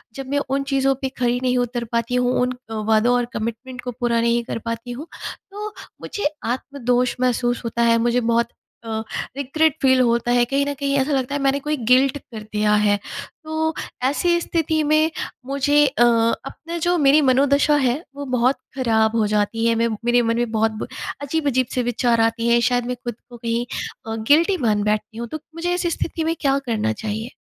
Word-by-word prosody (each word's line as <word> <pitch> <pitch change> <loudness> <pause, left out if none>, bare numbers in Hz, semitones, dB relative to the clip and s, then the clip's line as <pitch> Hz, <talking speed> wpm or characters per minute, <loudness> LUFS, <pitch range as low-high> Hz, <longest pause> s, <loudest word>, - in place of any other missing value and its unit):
जब 270 -1 -6
मैं 285 +1 +1
उन 275 +1 0
चीज़ों 270 0 +3
पे 265 - -1
खरी 245 0 +1
नहीं 250 0 +2
उतर 245 0 -1
पाती 235 +1 0
हूँ, 250 0 +2
उन 250 0 +1 0.3
वादों 220 +3 +3
और 245 0 +1
कमिटमेंट 235 +3 -5
को 250 - -4
पूरा 235 -1 +1
नहीं 235 0 +2
कर 230 - -4
पाती 230 +1 -4
हूँ, 275 +7 -7 0.4
तो 420 +1 -6 0.3
मुझे 410 -8 -2 0.2
आत्मदोष 250 -2 0
महसूस 245 -1 +1
होता 230 +1 -1
है। 230 0 +4
मुझे 240 +1 +2
बहुत 235 0 +1 0.4
अ, 220 -1 -2 0.4
रिग्रेट 280 +3 +1
फील 260 -1 +4
होता 235 0 +2
है, 245 0 +4
कहीं 275 +3 0
न 285 - -2
कहीं 280 0 0
ऐसा 270 +2 +1
लगता 270 +1 -1
है 285 - -1
मैंने 275 +1 +2
कोई 300 +2 -2
गिल्ट 265 +2 +5
कर 230 -5 -10
दिया 210 0 +2
है। 205 0 +3 0.5
तो, 315 +1 -1 0.3
ऐसी 345 +6 +2
स्थिति 320 -2 0
में 310 +1 +3 0.4
मुझे 285 +2 +3
अ, 260 -3 +2
अपना 240 +8 0
जो 350 +1 +1
मेरी 290 0 +5
मनोदशा 280 +2 +4
है, 245 -1 +2 0.2
वो 285 0 -5
बहुत 250 +3 +2 0.2
ख़राब 225 -4 +2
हो 220 -2 +2
जाती 210 +2 0
है, 230 - +4
मैं 230 +1 +2 0.2
मेरे 240 0 +4
मन 230 0 0
में 240 -1 -1
बहुत 220 0 +2
ब - - -3 0.3
अजीब-अजीब 285 -4 0
से 250 - +1
विचार 240 -1 +1
आते 230 +1 +1
हैं, 235 0 +5
शायद 245 0 +1
मैं 250 - -2
ख़ुद 240 -2 -6
को 240 - -11
कहीं 235 +1 -1 0.4
अ, 225 - -2
गिल्टी 335 +6 +5
मान 210 -1 +2
बैठती 215 +1 -1
हूँ, 235 +1 -4
तो 310 +7 -6 0.2
मुझे 350 +1 -1
ऐसी 355 -1 0
स्थिति 325 0 -2
में 325 +1 0
क्या 275 -1 +3
करना 215 - 0
चाहिए? 220 - -5
250 Hz, 200 wpm, -21 LUFS, 230-280 Hz, 0.5 s, गिल्ट